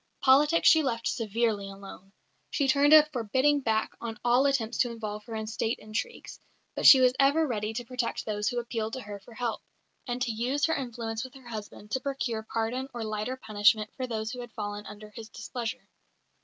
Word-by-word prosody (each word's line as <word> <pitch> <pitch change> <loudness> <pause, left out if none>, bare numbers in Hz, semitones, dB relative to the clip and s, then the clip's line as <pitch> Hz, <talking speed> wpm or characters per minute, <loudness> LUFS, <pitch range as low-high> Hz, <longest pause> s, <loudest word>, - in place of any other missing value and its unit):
Politics 290 +5 +5
she 320 - +7
left 230 -5 -2
severely 220 -2 -1
alone; 195 0 -11 0.4
she 280 - 0
turned 285 +2 +4
a 310 -1 +9
forbidding 260 +5 +2
back 220 -4 0
on 230 -1 -5
all 245 +3 +4
attempts 240 -4 -1
to 245 - +3
involve 215 -2 -6
her 230 -2 -7
in 220 0 -3
State 225 +1 -2
intrigues, 230 - -6 0.3
but - - +3
she 265 - +11
was 255 -1 +5
ever 285 +4 +4
ready 215 -5 -2
to 240 +1 -4
protect 250 0 -3
those 210 -1 -2
who 245 - -1
appealed 230 -2 -3
to 260 - -4
her 205 -2 -8
for 225 +4 -16
help, 235 -1 -2 0.5
and 245 0 -2
to 240 - -1
use 250 +6 0
her 320 - +1
influence 235 -4 -4
with 260 0 -10
her 260 -2 -14
husband 210 -1 -8
to 260 - 0
procure 260 -4 -3
pardon 225 +4 -3
or 235 - -3
lighter 215 +4 -3
punishment 215 -2 +2
for 255 -1 -3
those 220 -2 -3
who 250 - -7
had 240 -1 -8
fallen 205 -1 -5
under 210 0 -11
his 220 0 -10
displeasure. 235 +2 -6
235 Hz, 200 wpm, -28 LUFS, 215-260 Hz, 0.5 s, she